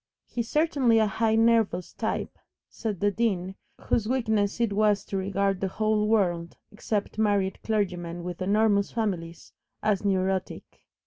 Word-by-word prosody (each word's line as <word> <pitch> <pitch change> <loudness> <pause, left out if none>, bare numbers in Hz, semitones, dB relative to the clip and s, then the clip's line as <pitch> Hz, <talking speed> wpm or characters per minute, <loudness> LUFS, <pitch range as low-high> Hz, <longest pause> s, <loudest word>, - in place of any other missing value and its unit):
"He's 235 -1 -4
certainly 285 -7 +3
a 220 - +4
highly 220 +2 +1
nervous 225 -6 +2
type," - - -3 0.3
said 210 -5 -5
the 205 0 +3
Dean, 195 -4 -1 0.3
whose 220 -1 0
weakness 220 -5 0
it 230 -4 +1
was 210 0 +2
to - - -5
regard 195 0 0
the 195 - +1
whole 215 +2 0
world, 175 -6 0
except 210 0 -3
married 200 -3 +1
clergymen 175 -5 -2
with 180 0 -6
enormous 200 +1 +2
families, 180 -7 -4 0.3
as 210 -2 +1
"neurotic." 190 -1 -2
205 Hz, 140 wpm, -27 LUFS, 190-220 Hz, 0.3 s, a